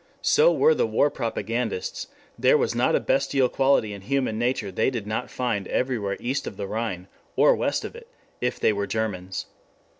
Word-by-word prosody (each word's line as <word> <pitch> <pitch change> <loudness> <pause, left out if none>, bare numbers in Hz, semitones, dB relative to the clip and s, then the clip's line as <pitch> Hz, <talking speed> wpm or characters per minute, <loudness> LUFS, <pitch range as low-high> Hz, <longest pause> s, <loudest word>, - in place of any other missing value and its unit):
So 480 +2 +5
were 475 +1 +4
the 470 0 +1
war - - +2
propagandists: 460 +2 -3 0.3
there 475 - +4
was 465 +1 0
not - - +2
a - - +3
bestial 140 - +1
quality 135 -6 +2
in 100 - -8
human 130 -1 -1
nature 120 -4 -1
they 95 - +1
did 120 -6 -4
not 110 +1 -3
find 115 -6 -2
everywhere 110 -7 -1
east 130 +4 -2
of 100 - -7
the 100 - -3
Rhine, 100 -4 -4 0.3
or - - +5
west - - -1
of - - -8
it 470 0 -12 0.3
if 125 0 -1
they 110 - +3
were 100 0 -2
Germans. 95 -4 -3
120 Hz, 185 wpm, -25 LUFS, 100-140 Hz, 0.3 s, So